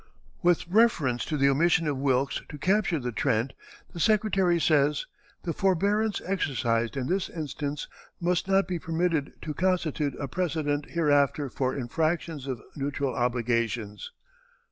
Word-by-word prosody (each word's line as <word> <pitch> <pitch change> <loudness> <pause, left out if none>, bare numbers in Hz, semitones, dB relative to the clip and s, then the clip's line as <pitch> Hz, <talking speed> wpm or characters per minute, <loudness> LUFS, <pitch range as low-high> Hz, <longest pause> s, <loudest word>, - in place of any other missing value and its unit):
With 175 -1 +2
reference 175 - +3
to 155 - -2
the 140 0 +4
omission 165 +4 +3
of 145 - 0
Wilkes 135 0 +1
to 150 - -7
capture 190 +2 +2
the 125 -3 -3
Trent, 115 +3 0 0.4
the 170 - -7
Secretary 195 -3 +3
says: 150 -2 +2 0.4
"The 170 - -2
forbearance 200 +5 +1
exercised 130 -10 0
in 130 - -1
this 185 +7 -1
instance 150 -2 -4 0.3
must 175 +1 0
not 195 0 +3
be 180 -2 -2
permitted 165 -2 -1
to 150 - -4
constitute 160 -5 0
a 140 - -3
precedent 150 -2 -1
hereafter 145 -3 +2
for 130 -1 -1
infractions 155 +2 -1
of 125 -5 -4
neutral 140 -1 -2
obligations." 115 -3 -1
150 Hz, 140 wpm, -27 LUFS, 135-175 Hz, 0.4 s, the